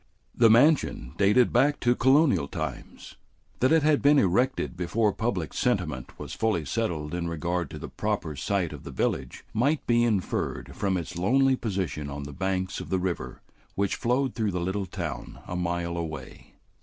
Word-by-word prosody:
The 115 Hz, -2 st, +5 dB
mansion 115 Hz, -, +3 dB
dated 105 Hz, +5 st, +4 dB
back 145 Hz, +2 st, +3 dB
to 120 Hz, -1 st, +4 dB
colonial 130 Hz, -, +4 dB
times. -, -, -6 dB, 0.4 s
That 130 Hz, -, +3 dB
it 160 Hz, -2 st, +4 dB
had 150 Hz, -1 st, +3 dB
been 145 Hz, +1 st, +5 dB
erected 125 Hz, 0 st, +1 dB
before 100 Hz, +4 st, +1 dB
public 100 Hz, -, -2 dB
sentiment 65 Hz, -2 st, -1 dB
was -, -, -7 dB
fully 105 Hz, -9 st, 0 dB
settled 80 Hz, -, -2 dB
in 85 Hz, -1 st, -2 dB
regard 85 Hz, 0 st, -2 dB
to -, -, -8 dB
the -, -, -7 dB
proper 75 Hz, -, -3 dB
site 85 Hz, +3 st, -1 dB
of 75 Hz, -, -9 dB
the -, -, -8 dB
village -, -, -2 dB
might 140 Hz, +7 st, +1 dB
be 120 Hz, 0 st, +3 dB
inferred 105 Hz, -6 st, -1 dB
from 95 Hz, -2 st, 0 dB
its 85 Hz, 0 st, -5 dB
lonely 135 Hz, +8 st, +3 dB
position 95 Hz, -, -3 dB
on 70 Hz, 0 st, -5 dB
the 70 Hz, +1 st, -8 dB
banks 95 Hz, +2 st, -2 dB
of -, -, -8 dB
the 95 Hz, -, +1 dB
river 90 Hz, -1 st, -4 dB, 0.3 s
which 100 Hz, 0 st, 0 dB
flowed 130 Hz, +1 st, 0 dB
through 110 Hz, -2 st, -1 dB
the 90 Hz, -2 st, -2 dB
little 95 Hz, +2 st, -2 dB
town -, -, -5 dB
a 90 Hz, -, -5 dB
mile 85 Hz, -1 st, -2 dB
away. 80 Hz, -5 st, -7 dB
95 Hz, 175 wpm, -27 LUFS, 85-120 Hz, 0.4 s, The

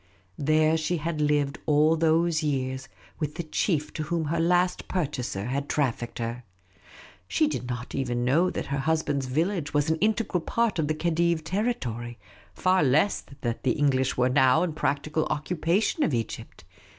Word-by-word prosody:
There 155 Hz, +2 st, +3 dB
she 160 Hz, +2 st, -1 dB
had 160 Hz, 0 st, -3 dB
lived 145 Hz, -1 st, +1 dB
all 155 Hz, +1 st, +4 dB
those 165 Hz, 0 st, +2 dB
years 130 Hz, -3 st, -2 dB, 0.3 s
with 150 Hz, -1 st, -3 dB
the 170 Hz, -, -3 dB
chief 155 Hz, -1 st, -1 dB
to 155 Hz, -, -4 dB
whom 165 Hz, 0 st, -1 dB
her 165 Hz, +3 st, -1 dB
last 180 Hz, +2 st, +1 dB
purchaser 135 Hz, -, -2 dB
had 140 Hz, +3 st, -3 dB
trafficked 120 Hz, -5 st, -1 dB
her. 120 Hz, +1 st, -4 dB, 0.8 s
She 100 Hz, +11 st, +2 dB
did 130 Hz, -5 st, -3 dB
not 125 Hz, 0 st, -5 dB
even 120 Hz, -3 st, -1 dB
know 165 Hz, +8 st, +3 dB
that -, -, -4 dB
her 140 Hz, -, 0 dB
husband's 145 Hz, -2 st, 0 dB
village 160 Hz, +2 st, -1 dB
was 145 Hz, +2 st, +2 dB
an 160 Hz, -, +1 dB
integral 210 Hz, -2 st, 0 dB
part 230 Hz, +1 st, 0 dB
of 155 Hz, -, +1 dB
the 155 Hz, -, 0 dB
Khedive's 170 Hz, 0 st, +1 dB
territory; 130 Hz, -, -2 dB, 0.3 s
far 185 Hz, 0 st, +2 dB
less 150 Hz, +8 st, +3 dB, 0.2 s
that 120 Hz, -1 st, -2 dB
the 130 Hz, -, +2 dB
English 130 Hz, -3 st, +1 dB
were 125 Hz, 0 st, +3 dB
now 130 Hz, +4 st, +4 dB
in 170 Hz, -3 st, -2 dB
practical 155 Hz, +1 st, -1 dB
occupation 175 Hz, -, 0 dB
of 150 Hz, -, +2 dB
Egypt. 115 Hz, -2 st, -5 dB
150 Hz, 165 wpm, -26 LUFS, 130-170 Hz, 0.8 s, all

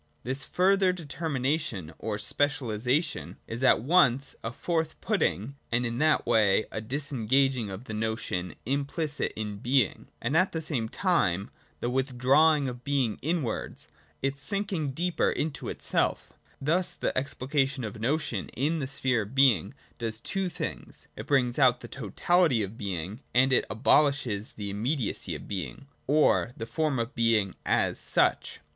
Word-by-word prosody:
This 130 Hz, +4 st, -2 dB
further 190 Hz, +1 st, +3 dB
determination, 145 Hz, -, -2 dB
or 110 Hz, -2 st, -3 dB
specialisation, 130 Hz, +3 st, 0 dB
is 115 Hz, +3 st, -5 dB
at 125 Hz, -3 st, +5 dB
once 140 Hz, -4 st, +3 dB
a 115 Hz, -, -3 dB
forth 160 Hz, +4 st, -2 dB
put -, -, 0 dB
ting 125 Hz, +9 st, -1 dB
and 120 Hz, +1 st, +1 dB
in 120 Hz, +1 st, -2 dB
that 155 Hz, 0 st, +3 dB
way 110 Hz, -3 st, +3 dB
a 110 Hz, -, -4 dB
disengaging 130 Hz, -1 st, 0 dB
of 95 Hz, +4 st, -7 dB
the 110 Hz, -, -7 dB
notion 110 Hz, -5 st, -2 dB
implicit 145 Hz, +4 st, -1 dB
in 105 Hz, -2 st, -4 dB
being; 120 Hz, 0 st, +1 dB
and 130 Hz, +6 st, -1 dB
at 185 Hz, +4 st, +3 dB
the 160 Hz, -, -1 dB
same 135 Hz, -8 st, -2 dB
time 105 Hz, -, +1 dB, 0.3 s
the 120 Hz, -, -1 dB
withdrawing 135 Hz, +3 st, +3 dB
of 125 Hz, -1 st, -6 dB
being 135 Hz, -7 st, 0 dB
inwards, 155 Hz, -7 st, -3 dB, 0.4 s
its 135 Hz, 0 st, -1 dB
sinking 190 Hz, -2 st, -1 dB
deeper 170 Hz, +6 st, 0 dB
into 155 Hz, -1 st, -3 dB
itself -, -, -1 dB, 0.3 s
Thus 170 Hz, +6 st, 0 dB
the -, -, -2 dB
explication 135 Hz, 0 st, -1 dB
of 105 Hz, -3 st, -4 dB
the 110 Hz, -, -11 dB
notion 130 Hz, -, -1 dB
in 155 Hz, +6 st, +1 dB
the 135 Hz, -, -2 dB
sphere 130 Hz, -3 st, 0 dB
of 105 Hz, +5 st, -8 dB
being 130 Hz, -, +4 dB, 0.2 s
does 110 Hz, -1 st, -3 dB
two 190 Hz, +9 st, -2 dB
things: -, -, -6 dB
it -, -, -8 dB
brings 130 Hz, -2 st, +2 dB
out 125 Hz, -2 st, +4 dB
the -, -, -8 dB
totality 135 Hz, -, +1 dB
of 100 Hz, +2 st, -6 dB
being, 95 Hz, +1 st, -4 dB, 0.2 s
and 130 Hz, +1 st, +5 dB
it -, -, +3 dB
abolishes 120 Hz, -1 st, +2 dB
the 100 Hz, -2 st, -5 dB
immediacy 115 Hz, +3 st, -2 dB
of -, -, -9 dB
being, 100 Hz, +7 st, -5 dB, 0.2 s
or 145 Hz, -4 st, +3 dB
the 115 Hz, -, -4 dB
form 155 Hz, +2 st, -1 dB
of 115 Hz, +3 st, -2 dB
being 115 Hz, -5 st, +2 dB
as -, -, +1 dB
such. -, -, +2 dB
130 Hz, 155 wpm, -28 LUFS, 110-150 Hz, 0.4 s, at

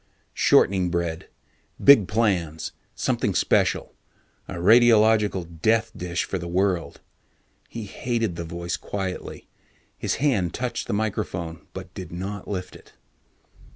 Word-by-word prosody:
Shortening 95 Hz, -1 st, +3 dB
bread 85 Hz, -2 st, -3 dB, 0.5 s
big 130 Hz, -9 st, +7 dB
plans, 90 Hz, -8 st, 0 dB, 0.2 s
something -, -, 0 dB
special, -, -, +1 dB, 0.5 s
a 95 Hz, -, -6 dB
radiological 105 Hz, -4 st, +4 dB
death 110 Hz, +2 st, +2 dB
dish 90 Hz, 0 st, -2 dB
for 95 Hz, -, -3 dB
the 85 Hz, -, -6 dB
world. 90 Hz, -1 st, -1 dB, 0.7 s
He 115 Hz, -, -6 dB
hated 115 Hz, -2 st, -2 dB
the 85 Hz, -, -4 dB
voice 85 Hz, +1 st, -4 dB
quietly. 95 Hz, -2 st, -5 dB, 0.5 s
His -, -, -2 dB
hand 110 Hz, -, +1 dB
touched 125 Hz, -1 st, -3 dB
the -, -, -2 dB
microphone 90 Hz, -6 st, -3 dB
but -, -, -9 dB
did -, -, -8 dB
not 95 Hz, +3 st, -5 dB
lift 90 Hz, -3 st, -5 dB
it. -, -, -16 dB
95 Hz, 120 wpm, -24 LUFS, 85-110 Hz, 0.7 s, big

